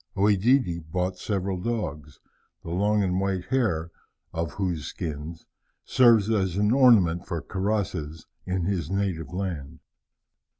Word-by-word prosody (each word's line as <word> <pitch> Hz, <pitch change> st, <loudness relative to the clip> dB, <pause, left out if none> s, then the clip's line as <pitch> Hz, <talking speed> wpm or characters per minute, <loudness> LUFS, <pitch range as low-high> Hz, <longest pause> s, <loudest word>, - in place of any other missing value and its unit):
OEdidi 100 Hz, -1 st, +3 dB
bought 90 Hz, +1 st, -1 dB
several 95 Hz, -1 st, -2 dB
dogs, 75 Hz, -, -4 dB, 0.4 s
the 85 Hz, -, -6 dB
long 105 Hz, +3 st, +2 dB
and 90 Hz, -1 st, 0 dB
white 95 Hz, -2 st, -1 dB
hair 90 Hz, -11 st, 0 dB, 0.4 s
of 80 Hz, -1 st, -3 dB
whose 90 Hz, -7 st, -2 dB
skins 80 Hz, +1 st, -6 dB, 0.4 s
serves 115 Hz, -5 st, +5 dB
as 95 Hz, -5 st, 0 dB
an 105 Hz, +1 st, +2 dB
ornament 110 Hz, -10 st, +5 dB
for 85 Hz, -3 st, -2 dB
cuirasses 90 Hz, -5 st, -3 dB, 0.2 s
in 90 Hz, -1 st, -1 dB
his 85 Hz, -4 st, -1 dB
native 95 Hz, -6 st, -2 dB
land. 90 Hz, -7 st, -4 dB
95 Hz, 125 wpm, -26 LUFS, 85-105 Hz, 0.4 s, serves